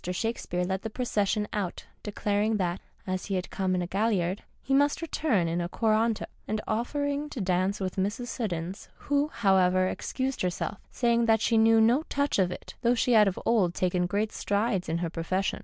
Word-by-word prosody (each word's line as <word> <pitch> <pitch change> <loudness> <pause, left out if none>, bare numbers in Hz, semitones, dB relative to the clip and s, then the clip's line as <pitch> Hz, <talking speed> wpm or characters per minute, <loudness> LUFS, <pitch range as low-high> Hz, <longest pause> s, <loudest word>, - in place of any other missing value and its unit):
Shakespeare 180 -3 -2
led 190 +1 -2
the 220 - -4
procession 210 -3 0
out, 195 -4 -3 0.2
declaring 210 +1 0
that, 180 -2 -1 0.2
as 185 -2 -3
he 195 - -1
had 185 0 -3
come 185 -1 0
in 180 - 0
a - - -4
galliard, 195 -2 0 0.2
he 270 - -2
must 285 +1 +3
return 295 - 0
in 170 +1 -1
a 175 - -3
coranto, 220 +1 +1 0.2
and 215 +1 -1
offering 285 +6 -1
to 275 - -6
dance 185 +1 0
it - - -3
with 185 0 -4
Mrs. 205 +6 -1
Siddons, 190 -6 -4
who, 285 0 0
however, 185 -7 +3
excused 265 +7 -3
herself, 180 +2 -2
saying 235 -1 +2
that 220 0 +4
she 230 +1 +1
knew 225 0 +5
no 235 +6 +4
touch 285 -5 0
of 180 -2 +2
it, - - -8
though 240 0 +3
she 245 +1 +1
had 215 -2 +6
of 190 - -1
old 195 -7 +2
taken 180 -1 +1
great 210 +4 -1
strides 200 -3 -1
in 165 - 0
her - - -2
profession. 185 +3 -1
205 Hz, 195 wpm, -28 LUFS, 185-235 Hz, 0.2 s, had